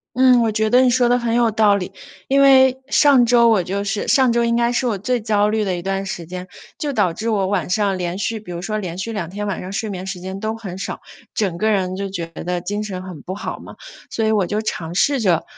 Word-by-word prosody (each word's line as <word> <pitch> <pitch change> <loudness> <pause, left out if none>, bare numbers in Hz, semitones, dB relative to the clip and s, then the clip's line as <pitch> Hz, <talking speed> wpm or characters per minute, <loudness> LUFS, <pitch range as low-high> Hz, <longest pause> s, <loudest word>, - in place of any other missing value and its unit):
嗯， 255 -1 +5
我 225 - +2
觉 215 0 0
得 250 - +6
你 255 - +4
说 245 0 +3
得 245 0 +3
很 235 -1 -1
有 235 -1 +3
道 210 -1 +3
理。 190 -1 -5 0.4
因 275 +1 +3
为 265 -1 +5
上 275 -4 +5
周 235 -1 +5
我 210 -5 +3
就 200 +3 -3
是 205 +1 -3
上 260 -3 +4
周 235 0 +2
应 235 0 +1
该 235 0 +2
是 245 +1 0
我 210 -5 -1
最 245 +4 -1
焦 210 -1 +1
虑 215 0 0
的 185 -3 -1
一 175 - -6
段 195 +1 -2
时 170 -3 -5
间， 180 +2 -7 0.3
就 290 -2 -2
导 180 -9 +1
致 220 +6 -4
我 200 -4 +1
晚 190 -3 -1
上 200 -1 +1
连 175 +1 -3
续 220 +1 -2
比 205 - -12
如 170 0 -5
说 215 +3 -3
连 180 -3 -5
续 225 +4 -4
2 170 -5 -4
天 205 +2 -4
晚 200 - -3
上 185 - -7
睡 220 +1 -3
眠 185 -1 -6
时 190 -2 -5
间 190 +1 -6
都 220 +1 -3
很 195 -5 -7
少， - - -5 0.3
整 190 -5 -1
个 220 +1 +1
人 185 -3 0
就 195 +1 -4
觉 175 -3 -4
得 175 +2 -4
精 205 +4 -3
神 190 -3 -5
很 180 -6 -9
不 185 - -5
好 210 - -5
嘛。 - - -12 0.3
所 225 - -1
以 220 - +2
我 200 -4 +2
就 210 +3 -1
尝 170 -5 -4
试 275 +6 +2
着， 180 -6 +2
205 Hz, 285 characters per minute, -20 LUFS, 185-235 Hz, 0.4 s, 得